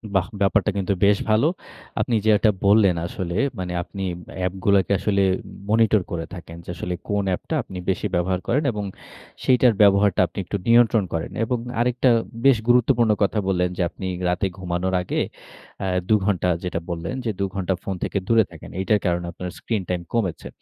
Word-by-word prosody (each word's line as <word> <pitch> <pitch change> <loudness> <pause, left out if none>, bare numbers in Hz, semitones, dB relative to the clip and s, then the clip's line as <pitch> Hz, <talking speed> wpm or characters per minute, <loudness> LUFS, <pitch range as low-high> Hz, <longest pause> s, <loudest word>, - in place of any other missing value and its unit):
বাহ! 90 -2 +2
ব্যাপারটা 100 +1 +3
কিন্তু 100 +1 0
বেশ 100 0 +5
ভালো। 110 +8 +4 0.5
আপনি 120 -3 0
যেটা 110 0 +4 0.2
বললেন 100 -3 +5
আসলে 85 -1 -4 0.2
মানে 90 -1 -3
আপনি 95 +1 -7 0.4
অ্যাপগুলাকে 95 +2 +1
আসলে 100 0 +1 0.2
উম - - -13 0.3
মনিটর 110 -2 +4
করে 80 -1 -3
থাকেন 85 -2 -9
যে, - - -11
আসলে 90 0 -4 0.2
কোন 105 -1 +1
অ্যাপটা 95 - -2
আপনি 95 - -9
বেশি 95 +2 0
ব্যবহার 90 +1 0
করেন 145 +6 +2
এবং 105 -1 -4 0.6
সেইটার 125 -2 +4
ব্যবহারটা 100 -2 +5
আপনি 85 - -21
একটু 100 - -2
নিয়ন্ত্রণ 115 -3 +5
করেন। 80 0 -3
এবং 125 +2 0 0.2
আরেকটা 125 +1 +2 0.4
বেশ 135 -4 +6
গুরুত্বপূর্ণ 120 -2 +4
কথা 105 +2 +1
বললেন 90 -2 +1
যে, - - -1
আপনি 95 - -7 0.2
রাতে 95 +2 0
ঘুমানোর 90 0 -2
আগে 90 - -1 0.6
আ - - -1 0.2
২ 110 - +6
ঘন্টা 90 -3 +1
যেটা 90 -2 -2
বললেন 85 +4 -4 0.2
২ 100 - +1
ঘন্টা 95 0 0
ফোন 95 - -3
থেকে - - -2
দূরে 115 -1 +5
থাকেন। 80 - -11
এইটার 105 +2 +2
কারণে 85 0 0
আপনার 90 +1 -6
স্ক্রিন 110 -4 -2
টাইম 90 -1 -1
কমেছে। 100 -8 -1
100 Hz, 175 wpm, -23 LUFS, 90-110 Hz, 0.6 s, বেশ